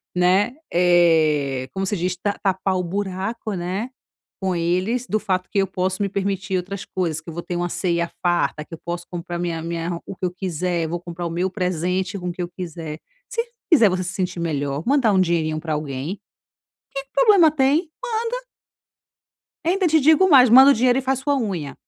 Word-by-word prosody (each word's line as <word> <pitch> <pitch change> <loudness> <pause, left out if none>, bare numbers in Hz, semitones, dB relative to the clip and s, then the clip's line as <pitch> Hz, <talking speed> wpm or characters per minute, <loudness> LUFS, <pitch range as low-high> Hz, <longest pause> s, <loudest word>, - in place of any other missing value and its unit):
né, 185 +6 +3 0.2
eh, 160 -7 +3
como 195 0 -2
se 200 +1 -1
diz, 180 +1 -1
"Ta 200 +2 -2
tapar 190 -1 0
o 180 - -1
buraco, 200 +4 -3
né, 190 +7 -3 0.5
com 190 -1 0
eles, 185 +9 0
do 215 - +1
fato 185 -3 -2
que 205 - -4
eu 195 - +3
posso 185 +2 -2
me 200 - -1
permitir 195 -1 -1
outras 190 +2 -5
coisas, 165 -4 -2
que 165 - -11
eu - - -7
vou 170 - -4
ter 175 - -4
uma 175 0 -1
ceia 170 -2 -1
farta, 175 -3 +1
que - - -14
eu - - -18
posso 175 0 -4
comprar 175 0 -5
minha 170 -2 -2
minha 170 0 -3
o 195 - -7
que 185 - -4
eu 180 - -1
quiser, 180 -2 -2
vou 175 +2 -3
comprar 175 0 -6
o - - -2
meu 180 +3 -1
presente 185 +1 -1
com 180 0 -4
o - - -2
que 180 - -6
eu 175 - -3
quiser". 165 -3 -7 0.3
Se 465 - -1 0.3
fizer 230 -9 +7
você 185 0 -1
se 185 - -5
sentir 180 -2 -2
melhor 145 -2 -2
mandar 260 -5 +3
um 190 - +3
dinheirinho 160 -3 0
pra 160 -1 -3
alguém, 150 +5 -4 0.8
que 275 - -2
problema 405 -10 +6
tem? 300 +4 +2 0.4
Manda. - - -4 1.2
Ainda 370 +1 +2
te 315 0 +4
digo 320 +6 +5
mais: 260 -5 +7
manda 265 +4 +9
o - - +5
dinheiro 250 +2 +3
e - - -3
faz 265 0 0
sua 285 +1 0
unha. 170 - -3
185 Hz, 205 wpm, -22 LUFS, 170-210 Hz, 1.2 s, manda